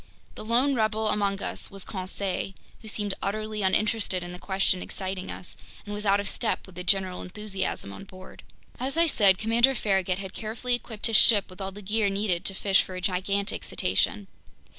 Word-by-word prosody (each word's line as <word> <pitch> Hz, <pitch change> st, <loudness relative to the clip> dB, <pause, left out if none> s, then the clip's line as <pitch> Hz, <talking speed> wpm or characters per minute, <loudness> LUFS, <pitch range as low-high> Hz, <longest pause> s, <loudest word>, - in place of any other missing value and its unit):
The -, -, -8 dB
lone 245 Hz, +6 st, +2 dB
rebel 220 Hz, -2 st, +1 dB
among 200 Hz, -1 st, 0 dB
us -, -, -4 dB
was 195 Hz, -1 st, -8 dB
Conseil, 190 Hz, 0 st, -3 dB, 0.3 s
who 220 Hz, -, -11 dB
seemed 210 Hz, -2 st, -1 dB
utterly 215 Hz, +1 st, -2 dB
uninterested 195 Hz, -1 st, +1 dB
in 175 Hz, -, -7 dB
the 180 Hz, -, -8 dB
question 190 Hz, -1 st, +1 dB
exciting 190 Hz, -1 st, -4 dB
us 180 Hz, -, -8 dB, 0.3 s
and 205 Hz, -, -6 dB
was 210 Hz, 0 st, -3 dB
out 200 Hz, +1 st, +5 dB
of 200 Hz, -, -1 dB
step 225 Hz, +3 st, -1 dB
with 190 Hz, -, -14 dB
the 180 Hz, +1 st, -6 dB
general 185 Hz, -1 st, +2 dB
enthusiasm 195 Hz, -, -4 dB
on 195 Hz, -, -9 dB
board. 185 Hz, -1 st, -12 dB, 0.4 s
As 270 Hz, +5 st, -1 dB
I 335 Hz, -, +6 dB
said, 200 Hz, -, +5 dB
Commander 235 Hz, +5 st, +4 dB
Farragut 190 Hz, -4 st, +1 dB
had 190 Hz, -1 st, -7 dB
carefully 230 Hz, +3 st, -3 dB
equipped 230 Hz, -3 st, -4 dB
his 225 Hz, -2 st, +5 dB
ship 205 Hz, -4 st, +5 dB
with 185 Hz, +2 st, -11 dB
all 190 Hz, 0 st, -3 dB
the 205 Hz, +2 st, -11 dB
gear 210 Hz, +1 st, +1 dB
needed 195 Hz, -3 st, 0 dB
to 195 Hz, -, +1 dB
fish 195 Hz, 0 st, +4 dB
for 185 Hz, -, -7 dB
a -, -, -4 dB
gigantic 195 Hz, +2 st, -1 dB
cetacean. 210 Hz, -1 st, +1 dB
200 Hz, 195 wpm, -27 LUFS, 190-215 Hz, 0.4 s, I